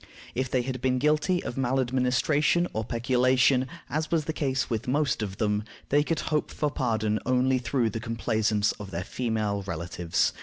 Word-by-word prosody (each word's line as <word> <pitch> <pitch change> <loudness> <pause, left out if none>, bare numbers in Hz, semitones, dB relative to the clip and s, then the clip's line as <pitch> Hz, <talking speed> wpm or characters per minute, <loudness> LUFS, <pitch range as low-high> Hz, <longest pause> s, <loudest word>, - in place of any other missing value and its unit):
If 130 0 -1
they 125 -1 +1
had 130 -1 -4
been 130 0 +2
guilty 155 +6 +2
of 120 - -5
maladministration 130 +6 +2
or 110 - -1
peculation, 125 +2 +2 0.2
as 155 +1 -2
was 160 -3 +1
the 160 - -2
case 135 -5 0
with 115 -2 -3
most 140 -1 +1
of 95 -3 -4
them, 105 -1 0 0.3
they 145 +1 +4
could 165 +2 -1
hope 150 - +1
for 150 -1 -1
pardon 110 -6 0
only 130 +1 +2
through 125 -2 0
the 115 - -3
complaisance 110 -2 0
of 105 -2 -7
their 85 -1 -3
female 110 -2 -1
relatives. 85 0 -1
125 Hz, 175 wpm, -27 LUFS, 110-135 Hz, 0.3 s, they